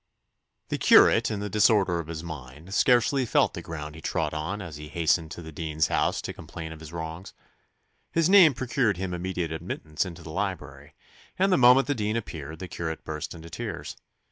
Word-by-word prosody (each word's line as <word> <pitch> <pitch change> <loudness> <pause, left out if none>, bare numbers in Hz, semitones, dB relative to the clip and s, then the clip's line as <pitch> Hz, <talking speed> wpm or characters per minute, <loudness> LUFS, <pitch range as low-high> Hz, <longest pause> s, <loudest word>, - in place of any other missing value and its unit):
The - - -2
curate, - - +6
in 105 -2 -3
the 105 - -3
disorder 100 -3 +3
of 80 - -6
his 80 0 -6
mind, 80 +2 -9
scarcely 125 +4 +3
felt 120 - +2
the - - -6
ground 75 -2 -7
he 80 - -11
trod - - -1
as 80 +1 -4
he 75 0 -8
hastened 80 +1 +1
to 85 - -8
the 80 - -9
dean's 80 0 -1
house - - 0
to - - -5
complain 80 -1 -8
of 80 - -9
his 80 -1 -10
wrongs. 80 +2 -7 0.8
His 165 -1 +2
name 180 -7 +7
procured 120 -5 0
him 95 0 -3
immediate 90 -2 -3
admittance 80 -1 -3
into 85 -3 -9
the 80 - -8
library, 80 -7 -5 0.4
and 195 +1 +3
the - - +5
moment 125 +2 +7
the 145 - 0
dean 105 -3 -2
appeared 80 -8 -6
the 95 - -7
curate 80 -2 -5
burst 75 +2 -5
into 85 0 -11
tears. 105 -3 -5
85 Hz, 195 wpm, -26 LUFS, 80-105 Hz, 0.8 s, name